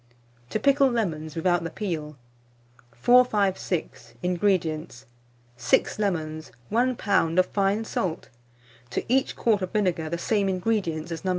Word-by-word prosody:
TO 215 - -1
PICKLE 275 +3 +4
LEMONS 160 - -2
WITHOUT 175 +1 +1
THE 165 - -3
PEEL. 155 -7 -4 0.8
456. 200 - +1
INGREDIENTS. 170 - -1 0.5
6 120 - +1
lemons, 155 - -2 0.2
1 250 +3 +2
lb. 185 -7 +1
of 185 - +5
fine 200 +3 0
salt; 175 -6 -3 0.6
to - - -2
each 260 +2 +1
quart 215 -4 +1
of 185 - -2
vinegar, 180 -7 0
the 170 - -2
same 200 +2 0
ingredients 180 -4 -1
as 165 - -5
No. 190 - -1
185 Hz, 130 wpm, -25 LUFS, 160-215 Hz, 0.8 s, of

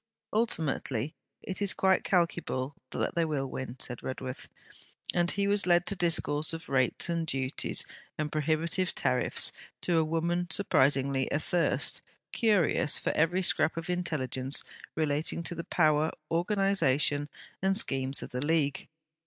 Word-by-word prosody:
'Ultimately, 155 - 0 0.3
it 190 +1 -4
is 200 - +1
quite 190 -1 +3
calculable 170 -7 0 0.2
that - - -2
they 170 -2 +1
will 150 -4 -1
win,' 130 -2 -6
said 125 -2 -5
Redworth; 130 0 -6 0.6
and 175 -1 +2
he 200 +1 0
was 205 -1 +2
led 175 0 +4
to 200 - 0
discourse 160 -4 +1
of 165 +2 -7
rates 130 -3 +2
and 170 -1 -1
duties 135 -2 +1 0.3
and 150 -1 -2
prohibitive 160 +4 0
tariffs - - +1 0.3
to 170 -2 +2
a - - +3
woman 170 +2 -1
surprisingly 135 -6 +2
athirst, 165 +3 +1 0.3
curious 205 -9 +2
for - - -1
every 175 +4 +2
scrap 165 -2 +2
of 165 +2 -3
intelligence 135 -7 -1 0.3
relating 155 +2 -1
to 170 - 0
the 170 0 -6
power, 155 -2 +3 0.2
organization, 165 -6 +2 0.3
and 195 +1 +2
schemes 135 -8 +1
of - - -9
the 125 +2 -2
League. 150 -2 0
160 Hz, 140 wpm, -29 LUFS, 140-175 Hz, 0.6 s, led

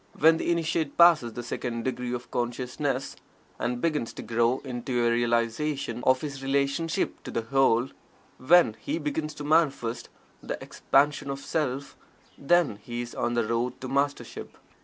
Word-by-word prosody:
When 160 +1 +6
the - - -2
Initiate 165 -3 -1
passes 165 -9 +6
the 120 - -5
second 115 -1 -4
degree 125 -1 -3
of 125 0 -5
consciousness, 125 +3 -2 0.4
and 120 0 -1
begins 150 -6 -1
to - - -7
grow 115 +2 +1
into 120 -1 -1
a 120 - +3
realization 120 +4 0
of 130 0 +4
his 140 -3 -5
relationship 140 +6 0
to - - -8
the 115 - -2
Whole 125 0 +3 0.5
when 165 -5 +5
he - - -3
begins 150 0 -3
to 145 - -7
manifest 145 -6 +1 0.3
the - - -4
Expansion 145 0 +1
of 135 - -2
Self 140 -3 -2 0.4
then 155 -8 +2
is 120 0 -4
he - - -12
on 120 - -1
the 120 -2 +1
road 115 +2 -1
to 130 - -4
Mastership. 140 +2 -2
130 Hz, 160 wpm, -27 LUFS, 120-150 Hz, 0.5 s, When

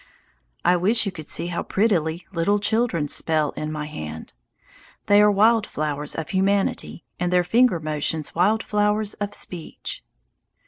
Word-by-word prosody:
I 180 - +4
wish 215 +6 +4
you 195 - -2
could 155 -4 -9
see - - 0
how - - -1
prettily 175 -5 0
little 180 +4 +1
children 210 -7 0
spell 155 0 +1
in 155 0 -5
my 150 -1 -4
hand. 80 - -8 0.7
They 205 0 +5
are 210 - +6
wild 215 +2 +3
flowers 150 -1 -3
of 160 - -5
humanity, 195 -2 0 0.2
and 180 0 -1
their 180 0 +3
finger 230 0 +3
motions 155 0 -1
wild 205 +6 +2
flowers 210 0 0
of 205 0 -4
speech. 175 -3 -6
180 Hz, 150 wpm, -23 LUFS, 155-210 Hz, 0.7 s, are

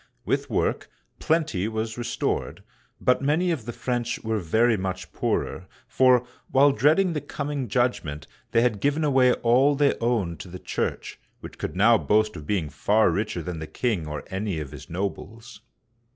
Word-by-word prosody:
With - - -1
work, - - -1 0.3
plenty 155 - 0
was 110 0 -3
restored, 120 0 -3 0.4
but 125 - +2
many 160 +6 +1
of 140 -10 -3
the 120 - -4
French 120 0 -2
were 110 -1 -1
very 110 +7 +2
much 95 -1 -4
poorer, - - -2 0.2
for, 125 -2 +4 0.2
while 140 +2 +5
dreading 155 - +3
the 150 - -2
coming 145 -2 -4
judgment, 105 - -1 0.2
they 115 - +3
had 115 -4 +1
given 145 +5 +1
away 130 -4 +4
all 130 +5 +3
they 140 0 +3
owned 110 -8 0
to - - -8
the 90 +1 -8
Church, - - -4 0.2
which - - -10
could - - -4
now 110 +4 +5
boast 110 0 +2
of 75 -1 -9
being 95 -7 0
far 105 +9 +3
richer 100 -5 -2
than 85 0 -5
the 80 - -6
king 105 -9 -2
or 75 -1 -5
any 95 -3 -2
of 70 -3 -6
his - - -11
nobles. 100 +6 -5
115 Hz, 170 wpm, -25 LUFS, 95-130 Hz, 0.4 s, while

